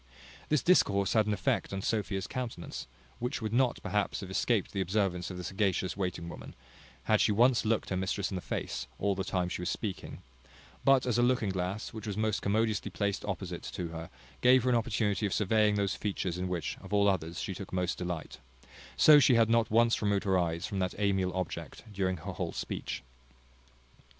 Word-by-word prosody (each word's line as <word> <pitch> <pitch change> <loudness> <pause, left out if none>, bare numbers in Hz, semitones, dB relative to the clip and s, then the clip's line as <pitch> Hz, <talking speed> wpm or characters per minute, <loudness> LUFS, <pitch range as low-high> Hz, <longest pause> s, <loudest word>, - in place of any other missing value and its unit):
This 150 -4 +2
discourse 100 - +3
had 110 -2 +3
an 105 - +1
effect 95 - 0
on 95 -1 -4
Sophia's 100 -3 -1
countenance, 120 - -5 0.3
which 125 +3 -2
would 110 -1 -3
not 125 0 +3
perhaps 105 +3 -1
have 95 -1 -7
escaped 105 +1 +1
the 100 - -1
observance 95 -2 0
of 90 - -6
the 90 - -5
sagacious 95 -1 0
waiting 90 -3 -3
woman, - - -9 0.5
had 110 +9 +3
she - - +3
once 120 +3 +4
looked 110 0 0
her - - +1
mistress 95 +2 -1
in - - -3
the 90 - -3
face, - - -4
all 100 0 +1
the 95 0 -2
time 90 -1 -1
she 90 - -4
was 90 - -2
speaking: 100 -4 -5 0.6
but 135 -2 +5
as 120 -1 +1
a - - +5
looking 120 -5 +2
glass, 95 +5 -3
which 110 -1 -7
was 100 -1 -3
most 110 -1 0
commodiously 110 +1 0
placed 100 -1 -2
opposite - - -4
to 85 -2 -5
her, 80 0 -7 0.3
gave 125 0 +6
her 130 - +2
an - - +4
opportunity 105 -3 0
of 100 - -3
surveying 105 0 +3
those 100 -1 +1
features, 95 -4 -3
in 90 - -2
which, 90 -2 -3
of - - -11
all 100 0 +4
others, 85 -4 0
she 95 - -3
took 95 +1 -8
most 90 -1 -1
delight; 90 -3 -5 0.6
so 150 -1 +8
she 125 -2 +5
had 115 -1 +4
not 115 -1 +3
once 115 +1 +3
removed 100 -2 +1
her 95 -2 +2
eyes 85 -2 0
from 100 - -3
that 90 -1 -1
amiable 95 -3 0
object 95 -2 -5
during 95 -2 0
her 80 - -6
whole - - -3
speech. 65 +1 -4
100 Hz, 205 wpm, -31 LUFS, 95-110 Hz, 0.6 s, so